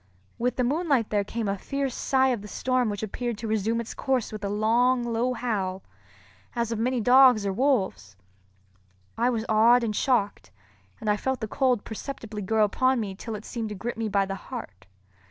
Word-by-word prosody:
With 245 +1 0
the 250 - 0
moonlight 280 -3 +1
there 205 -1 +2
came 225 +2 -4
a 195 0 -2
fierce 275 +2 -2
sigh 265 0 +2
of 240 -5 -1
the 210 - -9
storm 255 +3 0
which 205 0 -4
appeared 235 +2 -3
to 225 - -5
resume 220 +1 0
its 235 - -5
course 260 -4 -1
with 215 -1 -7
a 200 - -1
long, 235 +4 +2
low 240 +2 0
howl, 195 -6 -2 0.7
as 235 -1 -1
of 230 - -2
many 250 +2 0
dogs 245 -2 +6
or 195 - 0
wolves. 195 - 0 1.0
I 235 +2 +2
was 230 -3 -1
awed 230 +3 +5
and 215 -2 -1
shocked, 215 -6 0 0.5
and 220 - -7
I 210 0 +3
felt 265 +3 -2
the 220 - -3
cold 250 -2 +1
perceptibly 220 -2 -6
grow 215 +2 +2
upon 255 +5 +2
me 205 -4 -3
till 220 +3 -6
it 210 - -8
seemed 230 -3 -4
to 210 - -5
grip 235 +5 -4
me 225 -1 -2
by 200 -1 +2
the 195 - -4
heart. 195 - -8
225 Hz, 200 wpm, -26 LUFS, 210-250 Hz, 1.0 s, dogs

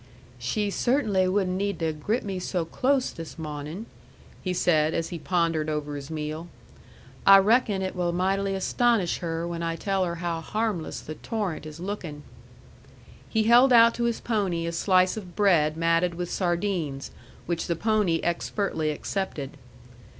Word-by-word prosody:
"She 200 - -1
cert'nly 215 -7 +2
wouldn't 185 -1 +1
need 200 -1 -1
to 160 -1 -1
grip 210 +11 -1
me 195 -2 -3
so 180 -2 -2
close 260 +9 +1
this 165 0 -9
mawnin'," 155 +5 -6 0.6
he 185 - -2
said, 160 -3 +2
as 165 - -1
he 170 - -5
pondered 165 -2 0
over 150 -1 -3
his 140 0 -7
meal. 155 +1 -4 0.8
"I 195 0 +9
reckon 210 -1 +3
it 185 - -3
will 175 -1 0
mightily 195 +2 0
astonish 210 -1 +1
her 165 0 -3
when 170 -1 -4
I 165 0 -1
tell 195 +2 0
her 170 -1 -2
how 170 -1 -3
harmless 210 -2 -2
the 155 - -7
torrent 185 -4 -4
is 155 +1 -10
lookin'." 175 -6 -5 1.1
He 220 -1 +2
held 240 +4 +6
out 230 -1 +7
to 235 - -1
his 235 -1 0
pony 195 -7 -1
a 170 - -2
slice 185 +3 +3
of 185 -5 -8
bread 165 -7 +3
matted 165 +1 +2
with 175 0 -4
sardines, 175 -6 -1 0.3
which 170 -1 -2
the 170 - 0
pony 205 -3 +1
expertly 170 -2 -1
accepted. 150 -3 -3
180 Hz, 160 wpm, -26 LUFS, 165-200 Hz, 1.1 s, I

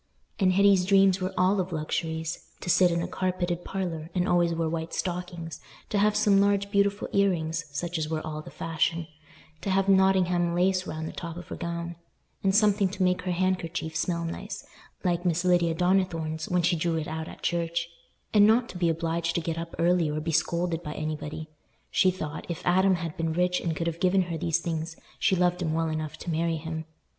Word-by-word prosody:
And 185 -2 +4
Hetty's 200 -1 +5
dreams 195 -1 +5
were 185 - -1
all 185 +2 +3
of 185 0 -2
luxuries: 160 0 -3
to 175 - 0
sit 180 0 +5
in 170 0 0
a - - -2
carpeted 180 -2 -2
parlour, 170 -5 -4
and 180 0 +1
always 175 -1 +3
wear 165 -1 0
white 160 0 -3
stockings; 175 -3 -4 0.3
to 205 - +2
have 210 +1 +3
some 205 -2 +4
large 200 0 +2
beautiful 200 0 +1
ear 200 0 +4
rings, 165 -2 -2
such 170 +4 -3
as 155 -1 -2
were 160 -1 -2
all 155 -1 -4
the - - -11
fashion; 165 +1 -1 0.6
to - - -3
have 195 0 +2
Nottingham 185 -3 +3
lace 185 +1 +2
round 160 0 -4
the - - -5
top 170 -1 -6
of 175 - -9
her - - -4
gown, 170 -1 -4 0.4
and 195 -1 +2
something 205 -2 +4
to 190 0 -2
make 180 0 +2
her 180 - -2
handkerchief 175 -3 -1
smell 170 0 -1
nice, 165 - -6 0.4
like 175 -2 +1
Miss 180 0 +1
Lydia 175 -2 +3
Donnithorne's 165 -3 0
when 180 -1 +2
she 175 +1 +3
drew 165 0 0
it 155 - -3
out 160 0 -4
at - - -11
church; 170 0 0 0.5
and 205 -1 +7
not 230 +2 +3
to 180 - -7
be 170 -2 +3
obliged 165 0 -1
to - - +2
get 165 0 -3
up 165 0 -6
early 170 -1 +3
or 150 +1 -2
be 165 +2 -2
scolded 170 +2 0
by 150 -3 -6
anybody. 155 0 -4 0.4
She 185 - +4
thought, 155 -5 -5
if 170 0 -5
Adam 190 +1 +4
had 165 -2 -5
been 165 -1 -1
rich 180 +1 +1
and 165 -2 -1
could 165 - -2
have 170 0 -2
given 185 +1 +3
her 170 -2 -4
these 165 +1 +1
things, 165 -1 -3 0.2
she 190 - +3
loved 180 0 +1
him 160 -2 0
well 165 0 0
enough 155 -1 -4
to 175 - -5
marry 165 0 0
him. 160 0 -5
170 Hz, 210 wpm, -27 LUFS, 165-185 Hz, 0.6 s, and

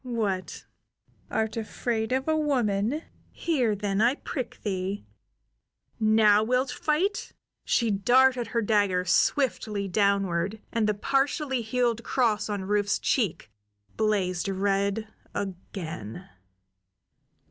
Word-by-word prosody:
"What, 215 -7 -3 0.6
art 220 0 -1
afraid 225 +1 -2
of 265 +2 0
a 315 - +3
woman? 255 -2 0 0.3
Here, 255 -10 0
then, 200 0 -1
I 240 +4 +4
prick 255 -5 -5
thee! 195 0 -3 0.9
Now 215 -1 +5
wilt 255 +4 +1
fight?" 365 +7 -1 0.3
She 230 -3 +2
darted 245 +4 +3
her 230 0 -1
dagger 205 -4 +2
swiftly 210 0 +1
downward, 195 0 +1
and 225 -2 +1
the 210 - +1
partially 270 +3 0
healed 235 0 0
cross 220 -5 +1
on 205 -2 -2
Rufe's 205 0 +1
cheek 200 - -1 0.4
blazed 195 -4 0
red 200 +2 0 0.3
again. 175 - -6
215 Hz, 105 wpm, -27 LUFS, 200-250 Hz, 0.9 s, Now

